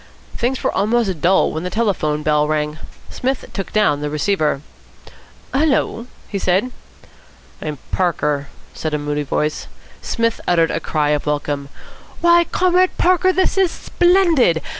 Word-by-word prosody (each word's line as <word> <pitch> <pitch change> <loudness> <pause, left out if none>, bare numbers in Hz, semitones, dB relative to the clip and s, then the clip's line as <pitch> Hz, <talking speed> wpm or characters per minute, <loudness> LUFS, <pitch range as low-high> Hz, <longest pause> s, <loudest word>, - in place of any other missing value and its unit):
Things 255 +2 -1
were - - +1
almost 205 -4 0
dull 185 +2 +3
when 155 - -4
the 180 - -3
telephone 180 -9 0
bell 150 -1 +2
rang. 150 0 -1 0.3
Psmith 260 +1 -2
took 195 - -5
down 150 -9 +2
the 150 - -2
receiver. 150 -2 0 0.9
"Hullo?" 265 -5 +1 0.2
he 200 - -3
said. 190 +7 +1 0.9
"I'm 150 -1 -4
Parker," 150 -6 0 0.3
said 155 -1 -3
a - - +1
moody 145 0 -2
voice. 150 +2 -2 0.3
Psmith 230 -1 -1
uttered 165 -2 +3
a - - -1
cry 150 -2 -1
of 150 0 -1
welcome. 145 -1 -2 0.5
"Why, 345 0 +5
Comrade 365 +1 +2
Parker, 370 +1 +3
this 375 +1 +1
is 380 -2 +4
splendid! 340 - +2
180 Hz, 140 wpm, -19 LUFS, -, 0.9 s, Why